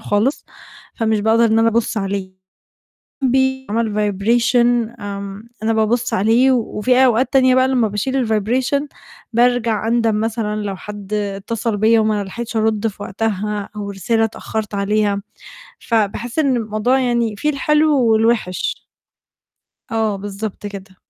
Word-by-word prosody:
خالص، 215 +8 0 0.5
فمش 220 -3 0
باقدر 225 +2 +3
إن 225 -1 +3
أنا 225 0 +4
أبُصّ 230 0 0
عليه، 195 -2 -3 0.9
بيعمل 265 -4 +1
vibration، 235 +3 +1
آمم، 200 +2 -7
أنا 225 +1 +1
بابُصّ 220 +2 0
عليه، 230 +7 +3
وفي 250 +1 +2
أوقات 250 +2 +2
تانية 260 -1 +5
بقى 260 0 +4
لمّا 250 -4 +2
باشيل 245 +5 -1
الvibration، 245 +6 0 0.5
بارجع 235 -2 +2
أندم 230 -2 +1
مثلًا 220 -1 -2
لو 200 -1 -3
حد 205 +1 -8
اتصل 205 +2 -2
بيَّ 220 +2 +4
وما 215 -2 +1
لحقتش 235 +4 -6
أرُد 220 0 +1
في 205 -1 -7
وقتها 210 0 -3
أو 205 -1 -5
رسالة 225 +4 0
اتأخرت 220 -1 -4
عليها، 200 0 0 0.6
فباحس 230 +3 -1
إن 275 -5 +2
الموضوع 220 +4 0
يعني 235 -4 0
فيه 300 +9 0
الحلو 300 -1 +2
والوحِش. 220 -4 0 1.1
آه، 220 -2 0
بالضبط 205 +1 -6
كده. 195 -1 -10
220 Hz, 130 wpm, -19 LUFS, 205-240 Hz, 1.1 s, تانية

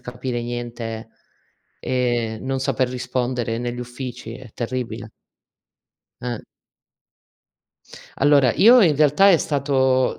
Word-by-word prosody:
capire 125 0 -5
niente 120 -2 -5 0.7
e 120 -3 -1
non 135 0 -2
saper 130 -2 0
rispondere 125 -2 -2
negli 120 0 -4
uffici, 120 -2 -7
è 130 -2 -12
terribile. 115 -3 -4 1.1
Eh. 120 -3 -4 1.7
Allora, 140 -4 +4
io 235 +2 +7
in 160 -5 +4
realtà 150 +7 +5
è 170 - +5
stato 130 -3 +1
125 Hz, 100 wpm, -22 LUFS, 120-135 Hz, 1.7 s, io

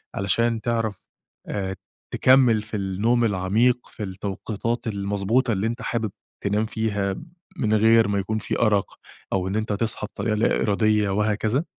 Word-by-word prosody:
علشان 115 +3 +1
تعرَف 115 -5 -1 0.5
آآ، 95 -1 -3 0.4
تكمّل 130 -4 +5
في 105 0 -5
النوم 105 +5 +1
العميق، 110 +5 +1
في 110 - -7
التوقيتات 105 +4 -4
المضبوطة 100 +4 0
اللي 100 +2 0
أنت 120 +1 -4
حابب 115 -3 -2 0.3
تنام 105 +2 +1
فيها، 105 -3 -1 0.4
من 110 -7 +1
غير 115 +1 +5
ما 100 -1 0
يكون 110 +3 -2
في - - -3
أرق، 105 -4 +1 0.3
أو 95 -1 0
إن 95 - -2
أنت 110 0 -1
تصحى 110 0 -2
بطريقة 105 +1 -2
لا 110 - +2
إرادية 105 -1 +2
وهكذا؟ 105 - 0
105 Hz, 150 wpm, -24 LUFS, 100-115 Hz, 0.5 s, تكمّل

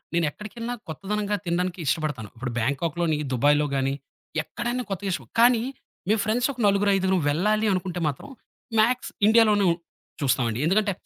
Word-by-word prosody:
నేనెక్కడికెళ్ళినా 210 +9 -2
కొత్తదనంగా 205 +5 -2
తినడానికి 180 +2 -1
ఇష్టపడతాను. 145 -7 -1
ఇప్పుడు 125 0 -4
బ్యాంకాక్‌లోని, 155 +5 0 0.2
దుబాయ్‌లోగాని 140 0 +2 0.5
ఎక్కడైనా 240 +5 -3
కొత్తగా 195 0 -2
ఇష్టం - - -5
కానీ 235 -1 +5 0.5
మేం 215 +1 +3
ఫ్రెండ్సొక 245 +4 0
నలుగురైదుగురు 195 -1 +3
వెళ్ళాలి 215 +8 +1
అనుకుంటే 180 -1 -2
మాత్రం 140 - -6 0.5
మ్యాక్స్ 245 +3 +1 0.2
ఇండియాలోనే 215 -2 +5
ఉ - - -1 0.5
చూస్తామండి. 120 -4 +1
ఎందుకంటే 200 +3 +2
190 Hz, 120 wpm, -25 LUFS, 150-215 Hz, 0.5 s, కానీ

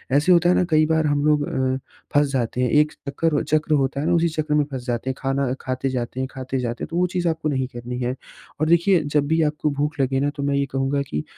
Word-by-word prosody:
ऐसे 150 +6 +4
होता 175 0 +5
है 180 - +4
न - - +1
कई 155 0 +4
बार 160 0 +1
हम 145 0 +1
लोग 150 -1 +2
अ, 130 0 0 0.4
फँस 145 0 +4
जाते 125 -1 -1
हैं। 125 - +2
एक 150 0 +3
चक्कर 145 +2 -1
चक्र 155 0 +1
होता 140 -1 +1
है - - -2
ना 175 - +3
उसी 170 0 +3
चक्र 155 -1 -2
में 150 0 +4
फँस 130 -2 -5
जाते 120 +2 -2
हैं, 130 - -2
खाना 135 -1 -1
खाते 130 +1 -2
जाते 125 0 -3
हैं 130 - -1
खाते 130 0 -4
जाते 120 -1 -3
हैं - - -3
तो 170 - -3
वो 180 0 +3
चीज़ 175 -1 0
आपको 160 -1 -2
नहीं 130 -2 -1
करनी 125 +1 -5
है। 125 +1 -1 0.4
और 155 - +1
देखिए 170 +2 +4
जब 145 0 0
भी 160 +2 +2
आपको 150 0 0
भूख 150 0 -1
लगे 135 0 +1
न 145 - +1
तो 140 - -4
मैं 140 0 +1
ये 140 0 +1
कहूँगा 135 +1 0
कि 75 - -2
145 Hz, 270 wpm, -22 LUFS, 130-155 Hz, 0.4 s, होता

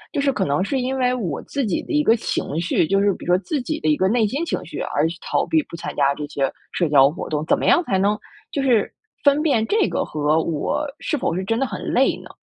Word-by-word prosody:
就 280 - +1
是 280 - +2
可 270 - -1
能 145 +5 +1
是 265 +7 -1
因 260 +1 -2
为 250 -1 +2
我 190 - -3
自 280 -3 -2
己 195 - -1
的 - - -9
一 300 - +4
个 230 - +5
情 155 -8 -3
绪， 170 -2 +1
就 195 0 +2
是 200 0 +3
比 - - -10
如 175 - +2
说 - - +3
自 280 - -2
己 310 +5 -3
的 - - +1
一 300 - +3
个 190 - +2
内 225 +2 +2
心 280 +10 -2
情 - - -3
绪 - - -7
而 145 - 0
去 170 - -7
逃 - - 0
避 320 -1 +2
不 - - -10
参 170 - -6
加 140 -1 +3
这 150 - -5
些 140 -2 -1 0.2
社 175 - 0
交 140 -1 +6
活 170 - -6
动， 150 0 -2
怎 - - +3
么 - - -2
样 350 - +4
才 190 - 0
能 205 +2 +2 0.3
就 280 - -1
是 240 -6 +3 0.4
分 285 +1 +5
辨 265 -9 +2
这 425 -1 +2
个 - - -1
和 150 +1 +1
我 165 - -1 0.2
是 310 - -1
否 175 -10 -1
是 185 - -2
真 225 +5 -1
的 270 - +1
很 - - -6
累 - - +2
呢？ - - -13
210 Hz, 305 characters per minute, -22 LUFS, -, 0.4 s, 交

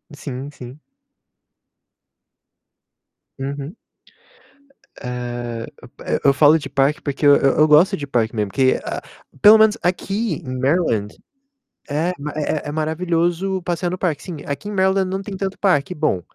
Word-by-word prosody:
sim, 140 -1 -6
sim. 130 +1 -11 2.6
Uhum. 140 +4 -5 1.3
Hã, 120 -2 -5 0.3
p - - -2
eu 140 - +6
falo 150 +3 +5
de 135 - -7
parque, 140 +2 +1
porque 140 0 -3
eu 145 0 +8
eu 150 +3 +3
gosto 150 +5 +5
de 145 - -5
parque 115 -3 0
mesmo, 105 -2 -1
porque 130 -1 +3
eu - - -3
a - - -4 0.4
pelo 215 +1 +9
menos 220 0 +4
aqui, 195 +5 -1
em 130 0 -5
Maryland, 130 - 0 0.7
é 155 +5 0
ma 150 +1 -5
é 150 0 -2
é - - -3
maravilhoso 170 +4 -1
passear 175 0 -2
no 185 - -4
parque, 160 -6 -1
sim. 175 -5 -7
Aqui 145 +8 -5
em - - -5
Maryland 190 0 +2
não 190 +1 -3
tem 195 -1 -7
tanto 195 0 -3
parque 180 -3 +1
bom, 150 - 0
150 Hz, 150 wpm, -20 LUFS, 135-180 Hz, 2.6 s, pelo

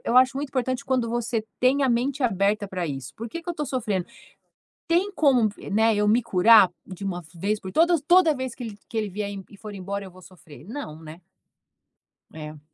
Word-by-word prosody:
Eu 240 - +1
acho 260 +1 +5
muito 285 0 -3
importante 255 -1 -1
quando 255 -3 0
você 235 -1 -1 0.2
tem 265 +3 +3
a 270 - +3
mente 260 +4 0
aberta 205 -2 +1
para 180 -3 -3
isso: 135 -3 -6
"Por 230 +2 -6
que 335 +9 -6
que 350 - -12
eu - - 0
estou 300 -3 -4
sofrendo? 215 -9 -2 0.8
Tem 355 +4 +2
como 255 -7 +4
vi 205 - -10
né, 220 +2 +3
eu 210 0 +2
me 230 +4 +4
curar 210 -1 +6 0.2
de 190 +1 -8
uma 180 -2 -3
vez 205 +5 -1
por 185 - -7
todas? 335 -1 +3
Toda 340 0 +5
vez 260 -2 -4
que 250 - -7
ele 215 -3 -7
que 225 - -3
ele 215 - -1
vier 200 +1 -4
em 195 -1 -7
e 205 - -13
for 215 0 -8
embora 200 +1 -5
eu 190 - -10
vou 185 - -16
sofrer?" 165 -6 -15
Não, 225 - -7
né? 160 +1 -11 1.1
É. 155 -1 -9
220 Hz, 220 wpm, -25 LUFS, 190-260 Hz, 1.1 s, curar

